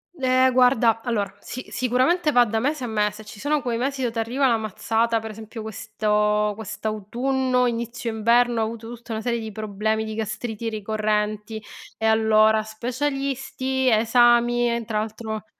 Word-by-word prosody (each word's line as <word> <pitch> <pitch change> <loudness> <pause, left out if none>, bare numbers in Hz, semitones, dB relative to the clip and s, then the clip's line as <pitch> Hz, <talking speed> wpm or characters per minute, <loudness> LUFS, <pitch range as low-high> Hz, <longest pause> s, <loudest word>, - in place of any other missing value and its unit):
Eh 260 -2 +3
guarda, 245 -3 +4
allora, 220 -5 -1
si 255 - -8
sicuramente 260 +7 +1
va 245 0 +7
da 220 0 -1
mese 285 +2 -1
a - - -2
mese: 210 0 -1
ci 210 -1 -12
sono 295 +2 0
quei 240 -2 -2
mesi 270 +2 -2
dove 240 -2 -1
t'arriva 240 +4 +1
la 230 -2 +3
mazzata, 225 +2 0
per 220 0 -7
esempio 220 +1 -9
questo 210 -1 0
quest'autunno, 245 +5 -1
inizio 235 0 -3
inverno 235 +1 +3
ho - - +2
avuto 230 +1 -7
tutta 230 -1 -8
una 220 - -3
serie 235 -1 -1
di 220 -1 -6
problemi 215 +1 -2
di 220 0 -5
gastriti 220 +1 -4
ricorrenti, 215 0 -2 0.3
e 220 - -2
allora: 220 0 +4
specialisti, 265 +2 -2
esami, 240 +1 +4
e 235 - -3
tra 215 -1 -3
l'altro 220 0 -5
225 Hz, 160 wpm, -23 LUFS, 215-245 Hz, 0.3 s, va